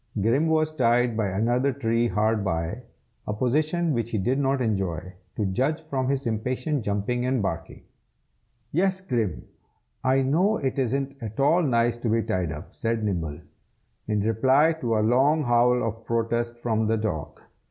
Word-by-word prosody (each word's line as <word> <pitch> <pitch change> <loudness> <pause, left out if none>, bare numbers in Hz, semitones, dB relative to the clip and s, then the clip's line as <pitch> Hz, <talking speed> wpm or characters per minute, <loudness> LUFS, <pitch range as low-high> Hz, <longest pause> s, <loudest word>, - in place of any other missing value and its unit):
Grim 120 +10 +2
was 155 -1 +1
tied 120 -3 +2
to 110 - 0
another 115 +7 +1
tree 120 -2 0
hard 110 +1 +1
by, 85 +4 -2 0.5
a 105 - -1
position 155 +7 +1
which 120 -2 -1
he 115 - -1
did 125 +8 0
not 135 -1 +1
enjoy, 95 -7 -2 0.2
to 105 - -1
judge 135 +12 0
from 135 -4 -2
his 140 -1 -1
impatient 125 +5 -1
jumping 105 +5 -1
and 130 0 +1
barking. 85 -3 -4 0.9
"Yes, 185 +3 +1
Grim, 120 - -2 0.6
I 135 +1 +3
know 180 +11 +2
it 135 -1 -2
isn't 135 +2 -1
at 110 +1 -7
all 155 +6 +4
nice 120 -5 +1
to 120 - -2
be 115 +1 +2
tied 95 -7 -1
up!" 75 -1 -9
said 115 -1 -2
Nibble, 85 -6 -2 0.7
in 105 -1 0
reply 130 +9 +3
to 115 -4 +1
a 105 - +2
long 140 +7 +3
howl 125 0 +3
of 115 +1 -6
protest 115 +1 -1
from 110 -2 0
the 110 +1 +2
dog. 80 -9 -4
120 Hz, 165 wpm, -25 LUFS, 110-135 Hz, 0.9 s, all